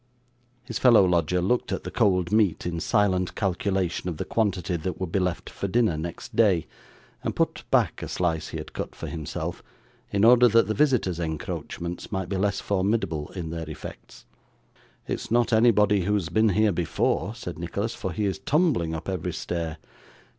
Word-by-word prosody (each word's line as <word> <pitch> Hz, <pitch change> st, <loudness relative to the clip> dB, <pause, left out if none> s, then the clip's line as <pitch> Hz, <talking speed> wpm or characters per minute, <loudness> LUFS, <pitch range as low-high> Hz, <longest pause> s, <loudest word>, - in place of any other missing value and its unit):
His 120 Hz, -3 st, -5 dB
fellow 120 Hz, -6 st, +6 dB
lodger 90 Hz, 0 st, +1 dB
looked 120 Hz, +6 st, 0 dB
at -, -, -2 dB
the -, -, -6 dB
cold 90 Hz, -6 st, +2 dB
meat 105 Hz, -6 st, +2 dB
in 85 Hz, -1 st, -2 dB
silent 95 Hz, -2 st, +1 dB
calculation 95 Hz, -2 st, -1 dB
of 85 Hz, -, -5 dB
the -, -, -3 dB
quantity 95 Hz, -5 st, 0 dB
that 85 Hz, +2 st, -4 dB
would 95 Hz, -3 st, -3 dB
be 100 Hz, -, +1 dB
left 90 Hz, -1 st, -2 dB
for 100 Hz, -, -4 dB
dinner 110 Hz, -3 st, +2 dB
next 80 Hz, +2 st, -6 dB
day, 95 Hz, -8 st, +4 dB, 0.6 s
and -, -, -2 dB
put -, -, -1 dB
back -, -, +2 dB
a -, -, -4 dB
slice 80 Hz, -3 st, -1 dB
he -, -, -6 dB
had -, -, -8 dB
cut -, -, -5 dB
for -, -, -7 dB
himself, 80 Hz, -3 st, -5 dB, 0.5 s
in 100 Hz, +2 st, +3 dB
order 125 Hz, +1 st, +7 dB
that 115 Hz, 0 st, +4 dB
the 110 Hz, -, -1 dB
visitor's 110 Hz, -, +2 dB
encroachments 85 Hz, +1 st, -5 dB
might 95 Hz, -3 st, -3 dB
be 95 Hz, -, -1 dB
less 100 Hz, +1 st, 0 dB
formidable 95 Hz, -6 st, 0 dB
in 85 Hz, -4 st, -4 dB
their 80 Hz, -1 st, -5 dB
effects. 80 Hz, -, -10 dB, 0.8 s
'It -, -, -1 dB
is -, -, -8 dB
not 120 Hz, +1 st, +2 dB
anybody 105 Hz, -3 st, +4 dB
who 105 Hz, +2 st, +2 dB
has 90 Hz, -6 st, -1 dB
been 110 Hz, +5 st, +3 dB
here 105 Hz, +2 st, +3 dB
before,' 90 Hz, +5 st, 0 dB
said 90 Hz, -8 st, -7 dB
Nicholas, 100 Hz, +6 st, -3 dB
'for 95 Hz, -, -4 dB
he 105 Hz, +6 st, -1 dB
is 95 Hz, -, -1 dB
tumbling 145 Hz, -, +1 dB
up 80 Hz, -, -7 dB
every 90 Hz, -2 st, -2 dB
stair. 85 Hz, 0 st, -3 dB
95 Hz, 185 wpm, -26 LUFS, 85-110 Hz, 0.8 s, order